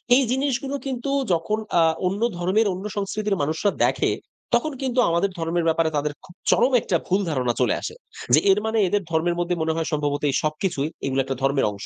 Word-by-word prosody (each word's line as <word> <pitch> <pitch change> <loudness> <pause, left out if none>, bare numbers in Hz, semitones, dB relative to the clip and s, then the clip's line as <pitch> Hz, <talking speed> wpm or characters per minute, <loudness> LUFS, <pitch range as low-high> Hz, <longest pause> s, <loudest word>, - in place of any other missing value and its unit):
এই 270 - +4
জিনিসগুলো 270 +1 -1
কিন্তু 260 0 -3 0.2
যখন 170 +6 0 0.2
আ - - +6 0.3
অন্য 200 +4 -2 0.2
ধর্মের, 195 +5 +2
অন্য 190 +3 -7
সংস্কৃতির 205 -1 -1
মানুষরা 160 +7 0
দেখে, - - +2 0.4
তখন 310 -1 +2
কিন্তু 255 -1 0
আমাদের 170 +4 +1
ধর্মের 165 +1 -1
ব্যাপারে 160 0 +2
তাদের 145 0 -1
খুব 175 - -16 0.2
চরম 250 +3 +4
একটা 175 - -1
ভুল 190 +2 +2
ধারণা 125 -5 0
চলে - - +3
আসে। - - -5 0.4
যে 155 - +8
এর 200 - +3
মানে 220 0 0
এদের 205 +2 +1
ধর্মের 170 +2 +1
মধ্যে 175 0 0
মনে 160 0 0
হয় 165 -1 -2
সম্ভবত 145 -1 -1
এই 135 - 0
সবকিছুই 155 -1 -1 0.2
এগুলো 135 0 0
একটা 135 0 -3
ধর্মের 135 0 +2
অংশ। 100 0 -8
175 Hz, 195 wpm, -23 LUFS, 155-215 Hz, 0.4 s, যে